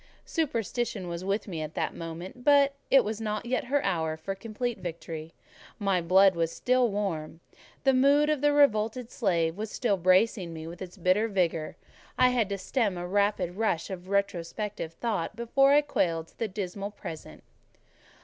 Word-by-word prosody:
Superstition 235 Hz, -, -2 dB
was 170 Hz, +1 st, -5 dB
with 200 Hz, +3 st, -1 dB
me 170 Hz, -5 st, -4 dB
at 155 Hz, 0 st, -6 dB
that -, -, -1 dB
moment; 170 Hz, +8 st, -8 dB
but 280 Hz, 0 st, +5 dB, 0.2 s
it 270 Hz, -, +6 dB
was 215 Hz, +1 st, -4 dB
not 215 Hz, 0 st, -3 dB
yet 250 Hz, +1 st, -1 dB
her 280 Hz, +3 st, +1 dB
hour 160 Hz, -2 st, 0 dB
for 195 Hz, +5 st, -4 dB
complete 225 Hz, +3 st, -4 dB
victory: 165 Hz, -2 st, -6 dB, 0.5 s
my 195 Hz, -4 st, +1 dB
blood 190 Hz, +3 st, +5 dB
was 165 Hz, -1 st, 0 dB
still 250 Hz, +3 st, +2 dB
warm; 170 Hz, -7 st, -3 dB, 0.4 s
the 270 Hz, -1 st, +4 dB
mood 280 Hz, +3 st, +4 dB
of 305 Hz, -3 st, +1 dB
the 290 Hz, 0 st, +4 dB
revolted 245 Hz, -4 st, +2 dB
slave 170 Hz, -7 st, 0 dB
was 215 Hz, +2 st, -4 dB
still 210 Hz, -3 st, 0 dB
bracing 185 Hz, 0 st, +2 dB
me 160 Hz, 0 st, -7 dB
with 170 Hz, +2 st, -9 dB
its 185 Hz, +1 st, -8 dB
bitter 185 Hz, +5 st, +2 dB
vigour; 170 Hz, -6 st, -1 dB, 0.4 s
I 255 Hz, -, +6 dB
had 240 Hz, -5 st, +1 dB
to 200 Hz, -, -2 dB
stem 205 Hz, -1 st, -1 dB
a 175 Hz, -, -4 dB
rapid 195 Hz, -2 st, 0 dB
rush 200 Hz, -6 st, 0 dB
of 185 Hz, 0 st, -7 dB
retrospective 200 Hz, -2 st, -2 dB
thought 210 Hz, -1 st, -2 dB
before 270 Hz, +4 st, +3 dB
I 290 Hz, +1 st, +6 dB
quailed 165 Hz, -, -1 dB
to -, -, -27 dB
the 225 Hz, -, 0 dB
dismal 195 Hz, 0 st, -4 dB
present. 165 Hz, -6 st, -9 dB
200 Hz, 175 wpm, -28 LUFS, 175-235 Hz, 0.5 s, it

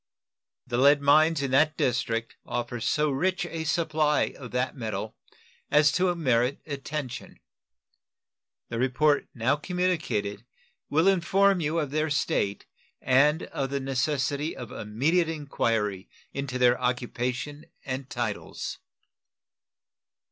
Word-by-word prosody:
The 120 Hz, -1 st, -1 dB
lead 140 Hz, +2 st, +6 dB
mines 150 Hz, +2 st, +4 dB
in 135 Hz, -, -2 dB
that 155 Hz, +3 st, +3 dB
district 115 Hz, -2 st, -1 dB
offer 120 Hz, 0 st, -4 dB
so 150 Hz, +6 st, +1 dB
rich 185 Hz, +7 st, 0 dB
a 165 Hz, -2 st, -5 dB
supply 155 Hz, -2 st, +1 dB
of 125 Hz, -3 st, -9 dB
that 125 Hz, +2 st, -1 dB
metal 110 Hz, -4 st, -4 dB, 0.5 s
as 150 Hz, 0 st, +5 dB
to 180 Hz, +2 st, +1 dB
merit 130 Hz, -4 st, +1 dB
attention. 140 Hz, -3 st, -6 dB, 1.3 s
The 115 Hz, -, -3 dB
report 145 Hz, +4 st, +2 dB
now 125 Hz, +4 st, +1 dB
communicated 155 Hz, -, -1 dB, 0.5 s
will 160 Hz, +5 st, +3 dB
inform 195 Hz, +1 st, +3 dB
you 160 Hz, 0 st, -1 dB
of 150 Hz, -4 st, -1 dB
their 155 Hz, +1 st, 0 dB
state 140 Hz, -9 st, 0 dB, 0.3 s
and 145 Hz, +5 st, +3 dB
of 135 Hz, -1 st, -3 dB
the 140 Hz, 0 st, -1 dB
necessity 140 Hz, +2 st, -1 dB
of 120 Hz, -3 st, -8 dB
immediate 150 Hz, +11 st, 0 dB
inquiry 115 Hz, -10 st, -1 dB, 0.2 s
into 140 Hz, -2 st, -3 dB
their 125 Hz, -1 st, +3 dB
occupation 125 Hz, +4 st, -2 dB, 0.2 s
and 130 Hz, 0 st, -4 dB
titles. -, -, -4 dB
140 Hz, 120 wpm, -27 LUFS, 125-155 Hz, 1.3 s, lead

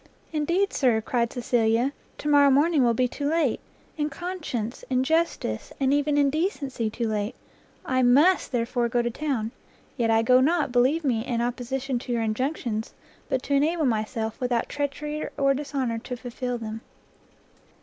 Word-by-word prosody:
"Indeed, 345 Hz, +6 st, +1 dB
Sir," 245 Hz, -5 st, +3 dB
cried 235 Hz, +1 st, -1 dB
Cecilia, 240 Hz, +1 st, +1 dB, 0.2 s
"to -, -, -5 dB
morrow 285 Hz, -1 st, +6 dB
morning 290 Hz, +1 st, +4 dB
will 235 Hz, -1 st, +3 dB
be 250 Hz, +2 st, +2 dB
too 285 Hz, +3 st, -3 dB
late, 315 Hz, -6 st, +1 dB, 0.4 s
in 295 Hz, 0 st, 0 dB
conscience, 295 Hz, -, -4 dB
in 255 Hz, -1 st, +2 dB
justice, 320 Hz, -, -1 dB
and 270 Hz, 0 st, +2 dB
even 290 Hz, 0 st, +2 dB
in 280 Hz, -1 st, +4 dB
decency 280 Hz, -, -1 dB
too 230 Hz, +2 st, -2 dB
late! 210 Hz, +1 st, -2 dB, 0.5 s
I 255 Hz, 0 st, +1 dB
must, 285 Hz, +10 st, +4 dB
therefore, 240 Hz, 0 st, 0 dB
go 240 Hz, +1 st, +1 dB
to 240 Hz, -, -1 dB
town; 240 Hz, -5 st, -2 dB, 0.5 s
yet 235 Hz, -3 st, +1 dB
I 225 Hz, 0 st, +4 dB
go 250 Hz, +2 st, +5 dB
not, 300 Hz, -1 st, +2 dB
believe 260 Hz, +7 st, +3 dB
me, 235 Hz, -6 st, +1 dB
in 240 Hz, -2 st, -2 dB
opposition 250 Hz, +2 st, -2 dB
to 245 Hz, -, -6 dB
your 235 Hz, -1 st, 0 dB
injunctions, 225 Hz, -1 st, -2 dB, 0.3 s
but 260 Hz, 0 st, 0 dB
to 285 Hz, -, -2 dB
enable 310 Hz, +3 st, +2 dB
myself, 220 Hz, -1 st, -1 dB
without 245 Hz, -2 st, 0 dB
treachery 295 Hz, +1 st, -3 dB
or 275 Hz, -1 st, +3 dB
dishonour, 270 Hz, -4 st, -2 dB
to 250 Hz, +1 st, -6 dB
fulfil 245 Hz, 0 st, -4 dB
them." 220 Hz, -1 st, -6 dB
255 Hz, 165 wpm, -25 LUFS, 235-290 Hz, 0.5 s, morrow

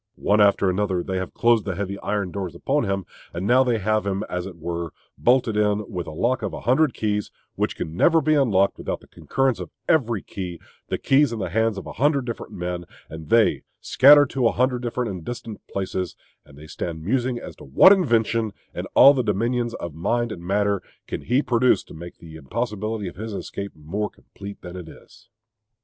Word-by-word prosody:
One 105 Hz, +1 st, +2 dB
after 100 Hz, -1 st, +4 dB
another 95 Hz, -1 st, 0 dB
they 95 Hz, -1 st, -3 dB
have 95 Hz, 0 st, -5 dB
closed 115 Hz, -2 st, +3 dB
the 95 Hz, -3 st, -3 dB
heavy 100 Hz, +1 st, -4 dB
iron 100 Hz, -3 st, -2 dB
doors 95 Hz, -3 st, -5 dB
upon 140 Hz, +9 st, 0 dB
him; 95 Hz, -2 st, -2 dB, 0.3 s
and 90 Hz, +3 st, -3 dB
now 125 Hz, +5 st, +5 dB
they 120 Hz, -3 st, +1 dB
have 110 Hz, +1 st, 0 dB
him, 100 Hz, 0 st, -2 dB
as 90 Hz, +1 st, -4 dB
it 90 Hz, -3 st, -10 dB
were, 85 Hz, 0 st, -4 dB, 0.2 s
bolted 120 Hz, -3 st, +2 dB
in 105 Hz, 0 st, +1 dB
with 90 Hz, -3 st, -4 dB
a -, -, -5 dB
lock 120 Hz, +11 st, 0 dB
of 105 Hz, -, -3 dB
a -, -, -6 dB
hundred 130 Hz, +4 st, +2 dB
keys, 105 Hz, -1 st, -1 dB, 0.2 s
which -, -, -1 dB
can 80 Hz, -, -5 dB
never 165 Hz, -, +4 dB
be 155 Hz, 0 st, +2 dB
unlocked 105 Hz, -10 st, +2 dB
without -, -, -4 dB
the -, -, -18 dB
concurrence 135 Hz, -6 st, -1 dB
of 90 Hz, -3 st, -6 dB, 0.2 s
every 120 Hz, -, +2 dB
key; 90 Hz, -3 st, -6 dB, 0.3 s
the -, -, -2 dB
keys 140 Hz, -1 st, +3 dB
in 115 Hz, -, -3 dB
the 95 Hz, -5 st, -4 dB
hands 110 Hz, +1 st, +1 dB
of -, -, -6 dB
a -, -, -7 dB
hundred 140 Hz, +1 st, +1 dB
different 115 Hz, -2 st, -6 dB
men, 90 Hz, 0 st, -4 dB, 0.3 s
and 80 Hz, -1 st, -9 dB
they 115 Hz, -2 st, +4 dB, 0.2 s
scattered 145 Hz, +1 st, +6 dB
to 130 Hz, -3 st, +2 dB
a -, -, +2 dB
hundred 125 Hz, 0 st, +1 dB
different 120 Hz, -2 st, -2 dB
and 90 Hz, -3 st, -7 dB
distant 115 Hz, -1 st, -7 dB
places; 95 Hz, -3 st, -3 dB, 0.3 s
and 70 Hz, -1 st, -18 dB
they 75 Hz, -, -11 dB
stand 80 Hz, 0 st, -5 dB
musing 125 Hz, +5 st, 0 dB
as -, -, -8 dB
to -, -, -13 dB
what 70 Hz, -, +7 dB
invention, 115 Hz, -, +1 dB, 0.2 s
in -, -, -5 dB
all 140 Hz, -, +9 dB
the 135 Hz, -, +1 dB
dominions 115 Hz, +2 st, -1 dB
of 85 Hz, -3 st, -6 dB
mind 120 Hz, +9 st, -1 dB
and 85 Hz, -, -7 dB
matter, 100 Hz, +1 st, +1 dB, 0.2 s
can -, -, -5 dB
he 130 Hz, +5 st, +1 dB
produced 125 Hz, +1 st, +2 dB
to -, -, -12 dB
make 85 Hz, +2 st, -10 dB
the 80 Hz, -1 st, -11 dB
impossibility 105 Hz, -, -3 dB
of 90 Hz, -, -9 dB
his 110 Hz, +1 st, -5 dB
escape 100 Hz, 0 st, -6 dB
more 90 Hz, +8 st, -3 dB
complete 100 Hz, 0 st, -11 dB
than 90 Hz, 0 st, -8 dB
it 90 Hz, -3 st, -8 dB
is.... 115 Hz, +7 st, -17 dB
105 Hz, 210 wpm, -23 LUFS, 90-120 Hz, 0.3 s, all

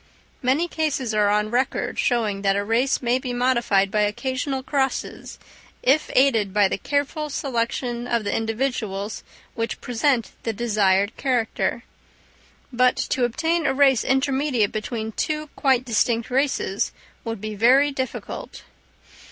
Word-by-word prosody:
Many 270 Hz, +7 st, +2 dB
cases 290 Hz, -8 st, -1 dB
are 210 Hz, -1 st, +3 dB
on 210 Hz, +1 st, +1 dB
record 250 Hz, +2 st, -1 dB
showing 215 Hz, -5 st, 0 dB
that 195 Hz, -1 st, +2 dB
a 200 Hz, -, 0 dB
race 240 Hz, +6 st, +1 dB
may 245 Hz, +1 st, +2 dB
be 255 Hz, -1 st, -4 dB
modified 240 Hz, -6 st, +2 dB
by 210 Hz, -, +2 dB
occasional 260 Hz, +5 st, -2 dB
crosses 270 Hz, -1 st, -2 dB, 0.5 s
if 275 Hz, +4 st, +3 dB
aided 230 Hz, -7 st, +3 dB
by 205 Hz, 0 st, +4 dB
the 190 Hz, -, -3 dB
careful 290 Hz, +3 st, -1 dB
selection 240 Hz, -2 st, -2 dB
of 235 Hz, -2 st, 0 dB
the 200 Hz, -, -1 dB
individuals 225 Hz, -3 st, -2 dB, 0.3 s
which 230 Hz, 0 st, -3 dB
present 245 Hz, 0 st, 0 dB
the 225 Hz, -, -2 dB
desired 205 Hz, -2 st, +1 dB
character; 240 Hz, -2 st, -1 dB, 0.9 s
but 250 Hz, +1 st, +4 dB
to 255 Hz, -4 st, 0 dB
obtain 325 Hz, +6 st, 0 dB
a -, -, +1 dB
race 270 Hz, -4 st, +4 dB
intermediate 265 Hz, -4 st, +1 dB
between 220 Hz, 0 st, -4 dB
two 305 Hz, +5 st, -3 dB
quite 260 Hz, -2 st, +2 dB
distinct 230 Hz, 0 st, 0 dB
races 260 Hz, -7 st, 0 dB, 0.3 s
would 225 Hz, -2 st, -4 dB
be 215 Hz, +1 st, -5 dB
very 260 Hz, +7 st, +4 dB
difficult. 260 Hz, -2 st, -5 dB
245 Hz, 135 wpm, -23 LUFS, 215-270 Hz, 0.9 s, by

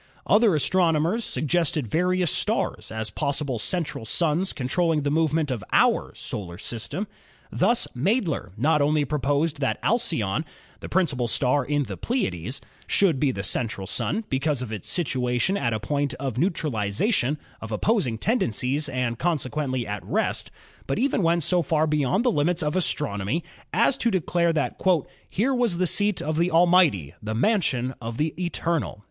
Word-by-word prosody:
Other 210 Hz, -4 st, +4 dB
astronomers 170 Hz, -, +2 dB
suggested 155 Hz, -, 0 dB
various 180 Hz, -, +1 dB
stars -, -, -1 dB
as 110 Hz, 0 st, -3 dB
possible 140 Hz, -4 st, -1 dB
central 165 Hz, -1 st, -2 dB
suns 165 Hz, -, +1 dB
controlling 155 Hz, +4 st, 0 dB
the 145 Hz, 0 st, -1 dB
movement 155 Hz, -1 st, +1 dB
of 115 Hz, -6 st, -3 dB
our -, -, +3 dB
Solar 85 Hz, -4 st, -5 dB
System. 120 Hz, -, -4 dB, 0.5 s
Thus 230 Hz, +6 st, +2 dB
Madler 165 Hz, -, 0 dB
not 150 Hz, +5 st, +2 dB
only 150 Hz, 0 st, +2 dB
proposed 145 Hz, +2 st, 0 dB
that 135 Hz, -, 0 dB
Al 235 Hz, -, +3 dB
cyone, 125 Hz, -, -1 dB, 0.4 s
the -, -, -8 dB
principal 150 Hz, -10 st, +1 dB
star 130 Hz, +4 st, +2 dB
in 145 Hz, +2 st, 0 dB
the -, -, -6 dB
Pleiades, 125 Hz, -, -2 dB, 0.3 s
should 175 Hz, -9 st, +3 dB
be 140 Hz, -1 st, +2 dB
the 100 Hz, -6 st, -5 dB
central 105 Hz, -1 st, -1 dB
sun, 215 Hz, -, -1 dB
because 135 Hz, 0 st, 0 dB
of 115 Hz, -, -7 dB
its 105 Hz, -4 st, -5 dB
situation 130 Hz, -1 st, +1 dB
at 120 Hz, -12 st, 0 dB
a 110 Hz, -, -1 dB
point 140 Hz, +5 st, -1 dB
of 135 Hz, -3 st, -3 dB
neutrali 150 Hz, -, 0 dB
zation 145 Hz, -, +1 dB, 0.2 s
of 115 Hz, -, -7 dB
opposing 130 Hz, -, +1 dB
tendencies 145 Hz, -, 0 dB
and 125 Hz, -3 st, -2 dB
consequently 140 Hz, -6 st, -1 dB
at 105 Hz, 0 st, -5 dB
rest, -, -, -1 dB, 0.4 s
but 135 Hz, -, -1 dB
even 260 Hz, -4 st, +1 dB
went 170 Hz, -1 st, +2 dB
so 180 Hz, +4 st, +2 dB
far 155 Hz, 0 st, +1 dB
beyond 150 Hz, -, +1 dB
the 245 Hz, -, +4 dB
limits 165 Hz, 0 st, +1 dB
of 150 Hz, +2 st, -1 dB
astronomy 145 Hz, -, -1 dB, 0.3 s
as 230 Hz, +7 st, +2 dB
to 235 Hz, -, +2 dB
declare 175 Hz, -3 st, +1 dB
that 155 Hz, -3 st, -2 dB, 0.5 s
"Here 245 Hz, +8 st, +1 dB
was 240 Hz, -8 st, +1 dB
the 185 Hz, -, +2 dB
seat 205 Hz, +2 st, +2 dB
of 155 Hz, +1 st, -2 dB
the 170 Hz, +2 st, +2 dB
Almighty, 165 Hz, -, +4 dB
the 110 Hz, +1 st, -4 dB
Mansion 130 Hz, -, +1 dB
of 115 Hz, 0 st, -5 dB
the 155 Hz, +1 st, 0 dB
Eternal." 170 Hz, -8 st, -2 dB
150 Hz, 160 wpm, -25 LUFS, 125-175 Hz, 0.5 s, Other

